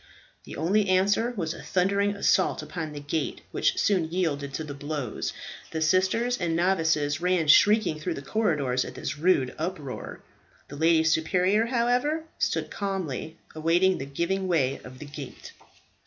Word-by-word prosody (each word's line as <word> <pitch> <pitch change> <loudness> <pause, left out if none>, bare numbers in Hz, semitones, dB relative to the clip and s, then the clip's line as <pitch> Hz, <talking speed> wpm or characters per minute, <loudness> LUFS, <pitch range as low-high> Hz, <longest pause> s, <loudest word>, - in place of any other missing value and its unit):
The - - -8
only 195 +6 +1
answer 200 +5 +3
was 165 -3 -2
a - - -10
thundering 200 +2 +1
assault 195 -1 +2
upon 160 -4 -5
the 145 - -7
gate, 145 +1 -3
which - - +1
soon 185 -6 +1
yielded 150 -6 -1
to 160 - -3
the 150 -2 -6
blows. 145 -4 -4 0.4
The 160 - -3
sisters 190 +9 +2
and 170 -3 0
novices 160 -4 +1
ran 180 -3 +1
shrieking 205 0 +5
through 165 +2 -3
the 140 - -7
corridors 145 - 0
at - - -9
this 150 - -5
rude 150 -7 +2
uproar. 155 -5 -5 0.5
The 145 - -8
lady 160 +1 +3
superior, 180 +7 +2
however, 250 +6 +1 0.2
stood - - -1
calmly 175 -6 -4 0.2
awaiting 170 +4 +2
the 135 - -5
giving 185 +7 -1
way 140 -7 +1
of 125 +1 -11
the 150 - -9
gate. 145 -2 -9
165 Hz, 155 wpm, -26 LUFS, 150-190 Hz, 0.5 s, shrieking